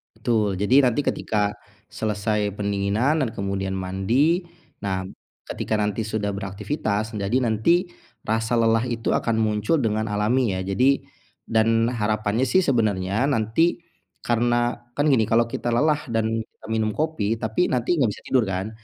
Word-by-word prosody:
Betul, 105 -5 0
jadi 125 +8 +4
nanti 125 +1 +2
ketika 105 -1 0 0.3
selesai 105 -1 -1
pendinginan 105 +9 0
dan 125 - -1
kemudian 100 -2 -3
mandi. 95 - +1 0.4
Nah, 95 -1 -2 0.4
ketika 110 - -2
nanti 105 +1 -1
sudah 105 -2 -2
beraktivitas, 105 +2 -3
jadi 100 +4 0
nanti 130 - +2 0.4
rasa 110 +2 +1
lelah 115 0 +3
itu 120 -2 -1
akan 115 -1 0
muncul 110 +7 +1
dengan 110 -3 -1
alami 110 +3 +1
ya. - - -2
Jadi 130 +8 +3 0.5
dan 115 0 +2
harapannya 110 0 0
sih 185 - +4
sebenarnya 110 - +1
nanti 135 +7 +1 0.4
karena 120 0 +1 0.2
kan 145 +3 +1
gini 120 -6 +4
kalau 115 +2 +2
kita 120 0 -2
lelah 150 +4 +2
dan 115 -2 0 0.4
minum 110 -1 0
kopi 150 -9 -1
tapi 110 +11 +1
nanti 125 +7 +1
enggak 130 -7 +3
bisa - - -12
tidur 130 -3 +3
kan? 95 +1 -3
110 Hz, 145 wpm, -23 LUFS, 105-120 Hz, 0.5 s, jadi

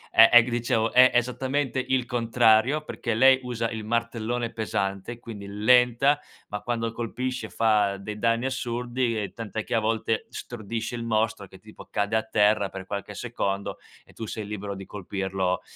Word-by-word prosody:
È 115 0 +9
è 120 - +9
g - - -7
ti - - -4
dicevo, 115 -1 0
è 130 0 +7
esattamente 130 +2 0
il 130 -2 +1
contrario, 120 +3 +3
perché 115 -6 -3
lei 130 +3 +6
usa 115 -2 -2
il 110 -1 -5
martellone 115 +1 -2
pesante, 105 0 -3
quindi 110 -4 -9
lenta, 125 +7 +3 0.3
ma 105 0 -5
quando 115 -1 -2
colpisce 120 0 -4
fa 105 -3 +2
dei 105 +2 -7
danni 115 +2 +1
assurdi, 120 -2 -1
e 100 - -5
tant'è 110 -1 -5
che - - -2
a - - +4
volte 110 0 -1
stordisce 115 0 -5
il 120 - -4
mostro 110 -3 0
che 95 - -15
tipo 110 0 -13
cade 105 +1 0
a 110 - +2
terra 105 -2 +2
per 95 -1 -8
qualche 100 +1 -5
secondo 100 -3 -3 0.3
e - - -20
tu 115 - -6
sei 110 0 -5
libero 105 -1 -5
di 95 0 -8
colpirlo 95 -2 -2
115 Hz, 175 wpm, -26 LUFS, 105-120 Hz, 0.3 s, È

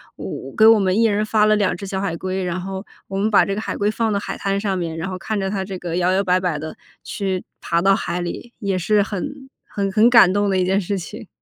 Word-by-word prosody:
我 135 - -7
给 220 - +6
我 225 -1 +7
们 190 0 +1
1 - - +4
人 210 -1 +2
发 215 -1 +3
了 215 0 +4
2 200 -4 0
只 200 - -7
小 190 0 -3
海 170 -4 -2
龟， 185 +2 -3
然 180 0 -2
后 190 +1 -5 0.2
我 195 - -4
们 210 +2 +1
把 210 - +5
这 200 - -2
个 210 - -3
海 - - -4
龟 205 +1 +1
放 225 0 -1
到 200 - 0
海 - - -5
滩 195 0 -1
上 200 -2 -1
面， 165 -3 -3
然 165 - -3
后 185 -1 -5
看 215 +3 -3
着 190 0 -2
它 195 -2 -2
这 190 0 -6
个 175 -1 -4
摇 180 0 +2
摇 195 +1 +2
摆 185 -1 +2
摆 180 -4 -1
地 155 +1 -7 0.3
去 190 -3 -3 0.2
爬 170 - 0
到 195 +3 +4
海 180 - -3
里， 205 +7 -6
也 200 -4 -1
是 205 +3 +2
很 265 +7 -6 0.2
很 200 -1 -2
很 215 +4 +5
感 230 -7 +7
动 205 0 +1
的 190 - +1
一 185 - +2
件 190 +2 +2
事 200 +2 -2
情。 210 +5 -8
195 Hz, 290 characters per minute, -21 LUFS, 185-210 Hz, 0.3 s, 我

